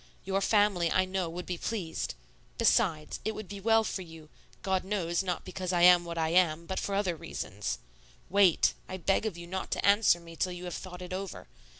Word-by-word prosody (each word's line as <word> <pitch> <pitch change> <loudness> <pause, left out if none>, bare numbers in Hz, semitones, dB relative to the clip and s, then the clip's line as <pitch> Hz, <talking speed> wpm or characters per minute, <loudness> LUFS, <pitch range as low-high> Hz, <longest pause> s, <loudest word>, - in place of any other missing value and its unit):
Your 195 +1 0
family, 200 -5 +3
I 185 - +3
know, 185 -2 -2
would 175 +2 -6
be 180 -2 -4
pleased. 190 -8 -3 0.4
Besides, 195 -9 +2
it 220 +1 -2
would 215 -2 -7
be 200 +1 -7
well 225 +2 +4
for 200 - -3
you 160 -3 -12 0.3
God 190 -1 0
knows, 185 -3 -1
not 180 -2 -3
because 185 0 -4
I 175 -1 +2
am 175 -1 +7
what 170 0 -5
I 160 -1 +1
am, 170 -2 +3
but 190 +2 -3
for 200 - -2
other 195 -4 0
reasons. 105 - -4 0.5
Wait. 195 -2 +4 0.2
I 185 - -4
beg 195 +4 +1
of 190 -6 -5
you 170 - -8
not 190 +2 -4
to - - -2
answer 200 -3 +5
me 165 -1 -12
till 180 +2 -1
you 175 0 -8
have 175 - -5
thought 180 -1 -7
it 180 0 -7
over. 190 0 -6
185 Hz, 215 wpm, -30 LUFS, 170-195 Hz, 0.5 s, am